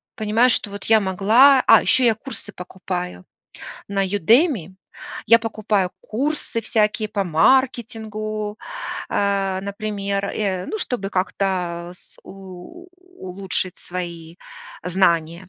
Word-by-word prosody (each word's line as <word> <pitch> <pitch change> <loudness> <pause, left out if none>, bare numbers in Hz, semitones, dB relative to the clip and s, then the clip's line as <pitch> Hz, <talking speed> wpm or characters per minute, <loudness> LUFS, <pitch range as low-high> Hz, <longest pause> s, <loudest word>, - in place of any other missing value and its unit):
понимаю, 225 +2 +2
что 230 - +1
вот 200 -1 -7
я 220 0 +5
могла 220 +8 +5
А, - - +8
ещё 260 - +2
я 230 -2 +4
курсы 220 -3 -9
покупаю 180 - -6 0.7
на 195 -1 0
Udemy. 205 - +2 0.5
Я 230 +1 +7
покупаю 215 -4 -1
курсы 270 0 -3
всякие 215 -1 0
по 200 -1 -2
маркетингу, 215 +2 0 0.5
а, 195 -1 0
например, 200 -1 -3
э, 190 -3 -2
ну, 435 - -4
чтобы 205 - -3
как-то 180 -2 -2
с - - -18
у 195 - -12 0.3
улучшить 185 0 -3
свои 170 -2 -7 0.5
знания. 175 -1 +1
200 Hz, 110 wpm, -21 LUFS, 185-220 Hz, 0.7 s, А